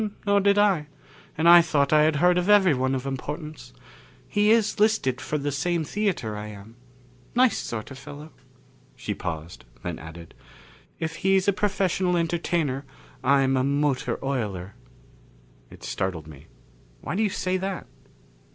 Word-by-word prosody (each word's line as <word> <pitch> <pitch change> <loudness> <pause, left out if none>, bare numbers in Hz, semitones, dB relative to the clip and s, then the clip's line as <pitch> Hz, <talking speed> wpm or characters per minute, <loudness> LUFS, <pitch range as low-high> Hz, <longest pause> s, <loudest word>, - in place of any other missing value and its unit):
"Nor 200 0 +4
did 200 0 +3
I. 195 -8 +3 0.5
And 160 +2 +2
I 175 0 +10
thought 150 -4 +1
I 155 - +6
had 155 0 +2
heard 180 +4 +4
of 180 +3 -2
everyone 145 -11 +4
of 130 0 -4
importance. 150 - -6 0.6
He 205 +1 +2
is 220 -2 +3
listed 210 - +2
for 150 - -2
the 145 0 -2
same 165 +4 -1
theater 175 - -2
I 105 0 -6
am. 105 +2 -11 0.6
Nice 250 -3 +4
sort 110 +2 -5
of 135 - -9
fellow." 150 +2 -10 0.6
She - - -4
paused, 80 0 -6 0.2
then - - -4
added, 80 +2 -11 0.7
"If 165 0 -4
he's 190 0 +2
a 200 - +4
professional 190 -3 0
entertainer, 165 -5 -1 0.4
I'm 135 0 +3
a 130 - +1
motor 140 -1 0
oiler." 105 -8 -3 1.0
It - - -15
startled 90 -5 -3
me. 75 -3 -13 0.5
"Why - - -4
do 210 - 0
you 215 - +2
say 185 0 -1
that?" 190 0 -4
150 Hz, 150 wpm, -25 LUFS, 130-185 Hz, 1.0 s, I